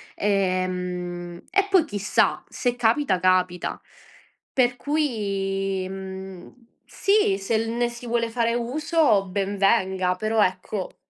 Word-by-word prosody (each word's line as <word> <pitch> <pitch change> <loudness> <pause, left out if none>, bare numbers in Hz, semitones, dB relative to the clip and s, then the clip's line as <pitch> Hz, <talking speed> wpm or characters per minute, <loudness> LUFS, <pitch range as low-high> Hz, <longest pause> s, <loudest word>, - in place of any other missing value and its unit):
ehm, 180 -3 -2
e 395 +1 +2
poi 370 -5 +4
chissà, 205 -6 +1
se 245 -2 -1
capita, 235 -3 +2
capita. 185 -1 +1 0.7
Per 245 -1 +2
cui, 195 -9 -1
mhmm, 190 -1 -8 0.3
sì, 395 - +2
se 220 +3 0
l 225 - -2
ne 240 0 0
si 240 0 -9
vuole 230 -1 0
fare 230 -1 +1
uso 245 - +2
ben 200 +1 -2
venga, 190 -3 +2
però 215 +2 +1
ecco 185 +1 -3
200 Hz, 120 wpm, -24 LUFS, 185-240 Hz, 0.7 s, poi